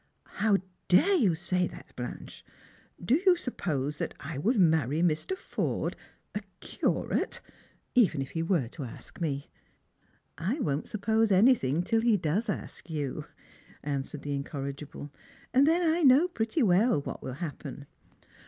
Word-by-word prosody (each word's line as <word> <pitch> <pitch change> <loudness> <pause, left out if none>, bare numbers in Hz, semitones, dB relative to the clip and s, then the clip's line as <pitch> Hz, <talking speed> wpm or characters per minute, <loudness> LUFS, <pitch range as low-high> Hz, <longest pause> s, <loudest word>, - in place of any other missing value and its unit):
" - - -46 0.2
How 210 -2 +5 0.3
dare 310 - +5
you 220 - +3
say 175 +2 0
that, - - -13
Blanche 125 -1 -7 0.5
P - - -11
Do 245 - +4
you 370 -2 +6
supj^ose 150 - -3
that - - -3
i 150 +2 -6
would 215 - +1
marry 160 -3 +3
Mr. 175 - 0
Forde - - -2 0.2
— - - -44
a 210 - -2 0.2
Curate - - -1 0.3
— - - -37
even 205 - +4
if 135 0 -4
he 165 - -2
were 165 -7 +1
to 145 - -7
ask 120 +7 -10
me?" 140 -4 -2 0.4
" - - -40 0.2
I - - -7
won't 145 - -1
suppose 220 +1 +1
anything 185 - +4
till 225 +3 +1
lie 230 -1 +4
does 190 +5 0
ask 190 - -5
you," 145 -5 -3 0.6
answered 140 0 -4
the 145 - -2
incorrigible; 140 0 -5 0.4
"and 270 +3 +5
then 335 +2 +3
I 325 +2 +2
know 280 +4 +6
pretty 240 -2 0
well 195 -1 +4
what 140 - -6
will 130 - -5
happen. 145 -2 -6
175 Hz, 160 wpm, -29 LUFS, 145-230 Hz, 0.6 s, you